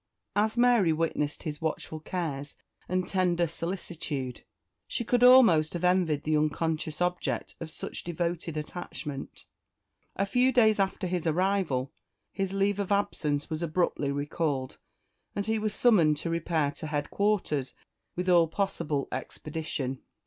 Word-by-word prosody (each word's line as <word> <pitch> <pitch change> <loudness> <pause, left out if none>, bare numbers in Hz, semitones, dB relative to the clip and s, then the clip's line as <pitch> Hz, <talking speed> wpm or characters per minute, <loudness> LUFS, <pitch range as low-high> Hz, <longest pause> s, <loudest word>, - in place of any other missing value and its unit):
As 215 +3 +1
Mary 240 -8 +5
witnessed 155 -2 -1
his 150 -1 -5
watchful 160 0 -3
cares 150 -4 -4 0.3
and 185 0 0
tender 180 -3 +2
solicitude, 165 -6 -4 0.4
she - - -2
could 245 +2 +2
almost 225 -12 +7
have 175 0 -4
envied 180 -5 +2
the 155 0 +1
unconscious 155 +1 -1
object 180 0 -1
of 165 - -6
such - - -6
devoted 170 -1 -3
attachment. 150 -3 -6 0.7
A 195 - +1
few 250 +5 +3
days 220 -4 +4
after 195 0 0
his 180 -2 -1
arrival 165 -6 +1 0.4
his 195 -2 -2
leave 195 +1 +1
of 200 0 -2
absence 150 -7 0
was 155 +1 -2
abruptly 165 -4 0
recalled, 145 -2 -2 0.6
and 200 - -1
he 220 0 0
was 215 0 -1
summoned 180 -10 +4
to 165 +3 -3
repair 165 -3 0
to 155 - -7
headquarters 150 -1 0 0.4
with 180 +1 -2
all 175 -2 +5
possible 165 -6 -1
expedition. 140 -1 -4
170 Hz, 135 wpm, -29 LUFS, 150-195 Hz, 0.7 s, almost